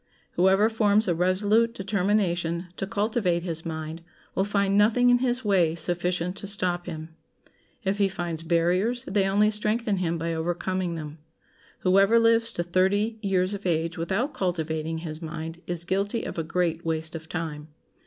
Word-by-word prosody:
Whoever 190 +4 +4
forms 215 -1 +2
a 175 - +3
resolute 205 +7 +2
determination 185 -3 0
to 195 - -3
cultivate 205 -5 0
his 165 -2 -3
mind 160 0 -5 0.3
will 190 - +1
find 200 -1 +1
nothing 230 +4 +4
in 245 - +4
his 250 -1 0
way 175 -6 +3
sufficient 175 +1 -1
to 200 - -6
stop 180 -3 -1
him. 160 -2 -6 0.7
If 195 +1 -1
he 200 - +4
finds 175 -4 -3
barriers 180 +8 +1
they 195 0 +1
only 210 +2 +3
strengthen 210 0 +1
him 170 -2 -1
by 165 +1 -2
overcoming 175 +2 -2
them. 155 -1 -7 0.6
Whoever 195 +4 +4
lives 230 0 +3
to 175 - -2
thirty 200 +5 +1
years 190 -2 +1
of 200 0 -6
age 165 0 0
without 190 - -1
cultivating 160 -3 -2
his 160 -1 -6
mind 165 +1 -6
is 175 -1 -1
guilty 200 +5 -1
of - - -5
a - - -1
great 170 0 -1
waste 160 -1 -2
of 160 -1 -8
time. 155 -3 -4
185 Hz, 165 wpm, -26 LUFS, 165-205 Hz, 0.7 s, Whoever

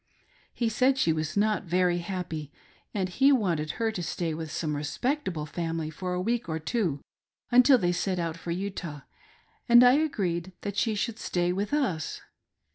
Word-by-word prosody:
He 235 - -1
said 255 +4 +2
she 170 -12 +3
was 155 +3 -3
not 215 0 +1
very 175 0 +2
happy, 170 -5 -5 0.4
and 195 -3 -1
he 270 +10 +4
wanted 175 - +1
her 225 -1 0
to 195 - -4
stay 170 -1 -2
with 160 0 -5
some 155 -2 -2
respectable 170 - -2
family 165 0 -3
f 160 - -14
ot 180 -1 -1
a - - -1
week* 230 +1 -1
or 160 - -1
two 160 - -1 0.5
until 250 +2 +7
they 175 -5 +1
set 180 +1 -1
out 165 -2 -2
for 170 +1 -9
Utah, 170 -5 -4 0.7
and 240 +1 +9
I 250 0 +7
agreed 190 - 0
that 200 -1 -4
she 220 0 +1
should 220 +3 -2
stay' 175 -4 0
with 200 +2 -2
us. 250 - -1
180 Hz, 180 wpm, -28 LUFS, 165-225 Hz, 0.7 s, and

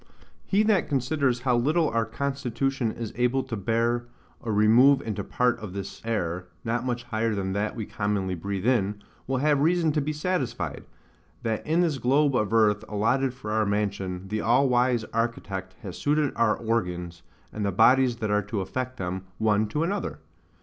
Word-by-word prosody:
He 205 +2 +3
that 210 -4 +2
considers 135 -2 0
how 125 -1 +2
little 155 +7 +2
our 115 0 0
constitution 135 0 -1
is 115 -2 -6
able 125 +2 +1
to 115 - -5
bear 115 +3 0 0.4
a 115 - -2
remove 115 +7 +6
into 110 -3 -3
part 125 -1 +1
of 105 -4 -7
this 100 0 -6
air, 90 -6 -2 0.2
not 115 +1 -1
much 120 -1 -2
higher 115 -2 -1
than 95 -1 -2
that 105 +2 -1
we 110 -3 -4
commonly 100 -3 -1
breathe 95 +3 -4
in, 105 -5 +1 0.2
will 135 0 0
have 145 +1 +2
reason 165 0 +3
to 150 0 0
be 150 +2 -2
satisfied, 155 -2 -2 0.6
that 110 -2 -1
in 165 +3 +3
this 160 -6 0
globe 140 +3 +3
of 105 -4 +1
earth 110 -2 +3
allotted 120 +6 +1
for 115 -5 -6
our 110 0 +2
mansion, 100 -3 -2
the 110 +1 -1
all 125 +5 +3
wise 125 -2 +2
Architect 100 -5 -3
has 95 -4 -7
suited 150 -1 +1
our 115 - +2
organs, 90 -7 -2 0.3
and 105 - -3
the 100 - +1
bodies 125 +5 +4
that 110 -3 -3
are 105 0 +3
to 105 0 -3
affect 130 +6 -4
them, 95 -2 -4
one 110 -1 +2
to 150 +9 -1
another. 195 +5 -2
115 Hz, 180 wpm, -26 LUFS, 105-135 Hz, 0.6 s, remove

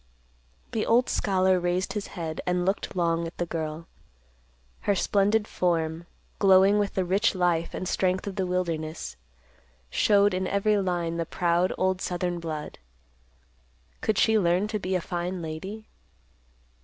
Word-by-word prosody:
The 220 - -1
old 245 +2 +3
scholar 185 -2 +2
raised 175 +1 -1
his 210 -2 -4
head 160 -2 -4
and 180 0 +1
looked 195 +1 -1
long 170 -1 +1
at 165 - -11
the 175 - -1
girl. 160 -1 -4 0.9
Her 205 - +1
splendid 205 +3 +2
form, 165 -1 -1 0.3
glowing 195 +1 +6
with 205 -1 -1
the 190 - +1
rich 195 +4 +2
life 175 -2 0
and 185 - -4
strength 185 0 0
of 200 -2 -5
the 190 -1 -1
wilderness, 160 - -3 0.8
showed 205 -1 +4
in 185 0 -1
every 205 +1 +2
line 175 -3 -1
the 165 - -1
proud 175 0 +1
old 185 0 0
southern 175 -1 -2
blood. 155 -3 -6 1.2
Could 215 -2 0
she 220 0 +4
learn 180 +2 +2
to 215 -1 -2
be 190 -1 -2
a 180 - 0
fine 180 +1 -3
lady? 180 +7 -6
180 Hz, 150 wpm, -27 LUFS, 170-195 Hz, 1.2 s, glowing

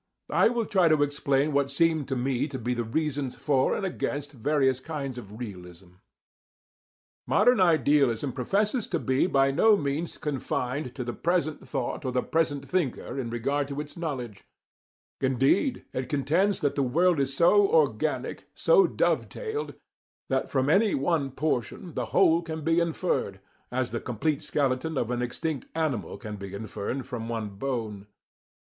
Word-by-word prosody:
I - - +5
will 235 -1 -1
try 185 -4 +3
to 155 -2 +4
explain 145 0 +1
what 140 -1 +2
seem 160 +1 +2
to 135 - -2
me 125 +1 0
to 140 -3 -5
be 125 0 -2
the 120 -1 -1
reasons 145 +2 -2
for 135 +1 +1
and 200 - -2
against 145 -5 -3
various 135 0 +1
kinds 135 -3 -5
of 105 -2 -11
realism. 90 -5 -9 1.4
Modern 245 -2 +4
idealism 145 -7 +3
professes 205 - 0
to 170 - -1
be 130 +1 +1
by 135 -5 +3
no 215 +9 +5
means 145 +2 -3
confined 130 -2 -3
to 130 - -3
the 120 0 -4
present 170 -1 0
thought 135 +1 -3
or 130 - -2
the 125 0 0
present 150 -4 0
thinker 160 -6 -2
in 120 -3 -3
regard 135 +5 -1
to 140 0 -5
its 150 0 -6
knowledge; 130 - -5 0.8
indeed, 135 - +2
it 130 -1 -3
contends 165 +8 +1
that 145 - +1
the 140 - 0
world 165 +6 +3
is 135 0 0
so 395 - +5
organic, 475 0 +1
so 445 -6 +5
dove - - +1
tailed, 445 -2 -5 0.5
that - - 0
from 130 -2 +1
any 200 +7 +4
one 140 0 0
portion 145 - -2
the - - -2
whole 170 -3 +4
can 160 -2 -6
be 165 +2 +3
inferred, 165 - -1 0.3
as 125 0 -1
the 115 - -2
complete 135 +5 -1
skeleton 140 +2 -1
of 120 -2 -1
an 125 0 -1
extinct 135 +3 -3
animal 155 -8 -1
can 105 -3 -7
be 100 0 -7
inferred 110 +5 -4
from 120 -4 -5
one 110 -2 -3
bone. 105 -2 -4
140 Hz, 165 wpm, -27 LUFS, 125-160 Hz, 1.4 s, I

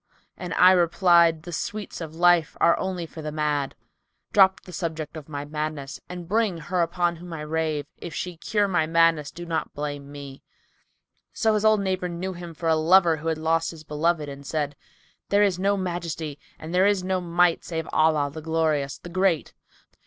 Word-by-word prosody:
* - - -38
And 180 - -7
I 180 +1 +7
replied, 170 -2 +4
The 175 - -8
sweets 210 +2 -5
of 160 -1 -7
life 175 -2 +3
are 170 - +5
only 185 -3 -3
for 160 0 -10
the 150 0 -4
mad. 150 -2 -1 0.6
Drop 190 -2 +5
the 180 - -13
subject 160 -4 -4
of 155 -1 -9
my 145 -1 -5
madness, 150 -2 -5
and 175 -1 -7
bring 210 -2 +1
her 175 +3 -1
upon 170 0 0
whom 175 +1 -10
I 160 - -5
rave 155 -1 -2
* - - -50
If 170 - -8
she 180 -1 -4
cure 205 +5 0
my 175 -5 +1
madness 165 -2 +3
do 175 - -9
not 165 -1 -3
blame 145 -1 -5
me." 140 -2 -9 0.9
So 220 -1 +2
his 210 0 0
old 215 -1 +4
neighbour 185 -2 -1
knew 180 +2 -4
him 170 -2 -9
for 165 - -4
a 160 - +4
lover 165 +1 +4
who 160 +2 -6
had 160 -1 0
lost 165 +1 +1
his 160 -2 -10
beloved 155 +1 0
and 140 0 -8
said, 145 -1 -2 0.5
"There 205 +1 +4
is 190 -3 +1
no 200 +1 +2
Majesty 170 -5 -4 0.2
and 160 +2 -8
there 185 +2 +4
is 200 -3 +1
no 185 0 -1
Might, 175 0 +2
save 160 -2 -4
in - - -11
Allah, 155 -2 +3
the 160 - -7
Glorious, 155 -3 0
the 175 - -11
Great! 185 -3 +1
165 Hz, 205 wpm, -25 LUFS, 155-180 Hz, 0.9 s, I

